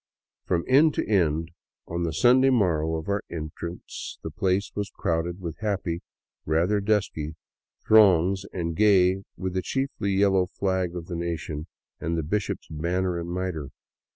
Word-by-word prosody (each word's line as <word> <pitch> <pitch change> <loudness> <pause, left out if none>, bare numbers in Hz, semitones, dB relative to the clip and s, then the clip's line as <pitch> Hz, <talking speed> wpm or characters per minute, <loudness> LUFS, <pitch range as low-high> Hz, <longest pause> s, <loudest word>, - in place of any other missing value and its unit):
From 85 -1 +1
end 145 +4 +5
to - - -1
end, 80 -5 +1 0.4
on 85 +1 -3
the 85 -1 0
Sunday 125 - +5
morrow 85 -10 +2
of 80 0 -5
our 100 0 0
entrance, 85 +2 -6
the - - -5
place 95 +1 0
was 105 -1 -3
crowded 85 +2 -2
with 85 -3 -6
happy, 95 -5 -2 0.4
rather 85 +7 +1
dusky, 100 -7 0 0.5
throngs, 95 -3 +5
and 85 -2 -3
gay 95 -2 +4 0.2
with 95 -1 -3
the 95 - 0
chiefly 135 -5 -2
yellow 95 -2 +3
flag 95 -2 -1
of 85 -2 -5
the 85 - -5
nation 85 -2 -4 0.3
and 85 +2 -2
the 80 - -1
bishop's 100 +6 -2
banner 85 +3 -1
and 85 0 -5
mitre. 90 -6 -3
90 Hz, 155 wpm, -26 LUFS, 85-100 Hz, 0.5 s, end